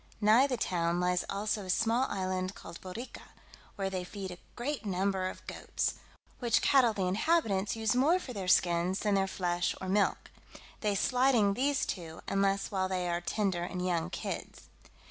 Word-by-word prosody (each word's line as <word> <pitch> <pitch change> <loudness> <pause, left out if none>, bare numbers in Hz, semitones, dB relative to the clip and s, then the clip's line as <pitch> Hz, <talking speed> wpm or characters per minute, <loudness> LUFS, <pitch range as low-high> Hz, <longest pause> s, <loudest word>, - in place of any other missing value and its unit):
Nigh 220 +6 +5
the 255 -3 -1
town 170 -4 0
lies 180 0 +1
also 205 +1 -1
a 185 - -9
small 230 +6 +2
island 185 0 -2
called 170 - -10
Borrica, 215 +7 -7 0.5
where 195 -2 -2
they 185 -1 -2
feed 185 -1 -7 0.2
great 250 -1 -3
numbers 190 -1 0
of - - -20
goats, - - -2 0.5
which 240 -2 +2
cattle 265 -5 +5
the 200 -3 -2
inhabitants 210 - +1
use 220 +1 +1
more 295 +8 +4
for 275 -9 -7
their 195 -4 -4
skins 175 +1 +3
than 210 -1 +1
their 195 -1 +2
flesh 175 -2 -1
or 190 - -5
milk; 200 +2 +1 0.5
they 210 -2 0
slighting 245 -2 +3
these 275 +5 +1
two, 165 -3 -5
unless 195 0 +1
while 190 -2 0
they 180 -1 -1
are 170 0 -1
tender 190 -1 -1
and 180 +1 -3
young 170 -3 0
kids. - - -6
195 Hz, 170 wpm, -31 LUFS, 180-225 Hz, 0.5 s, Nigh